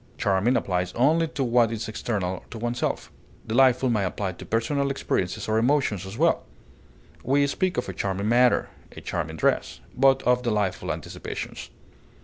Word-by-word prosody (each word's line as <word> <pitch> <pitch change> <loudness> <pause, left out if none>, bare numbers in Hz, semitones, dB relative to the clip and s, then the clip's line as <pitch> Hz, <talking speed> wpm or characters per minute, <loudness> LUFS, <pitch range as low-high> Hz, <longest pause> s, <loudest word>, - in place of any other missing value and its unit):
Charming 105 +5 +2
applies 90 -1 -1
only 155 +7 +3
to 145 -3 -3
what 120 -2 +3
is 115 -1 -4
external 100 -4 -3
to - - -8
oneself; 120 +2 -2 0.3
delightful 130 +2 +4
may 105 -3 +1
apply 95 +1 -2
to 90 - -11
personal 140 +5 0
experiences 95 -9 -2
or 110 0 +2
emotions 115 -7 +1
as 100 +4 -8
well; 165 +3 +3 0.8
we 140 - +2
speak 180 +6 -1
of 125 - -1
a - - -4
charming 100 +1 -2
manner, 120 +2 +3 0.2
a - - -10
charming - - -4
dress, - - 0 0.2
but 135 +1 +4
of 125 0 +3
delightful 105 -6 -1
anticipations. - - -6
120 Hz, 155 wpm, -25 LUFS, 100-135 Hz, 0.8 s, delightful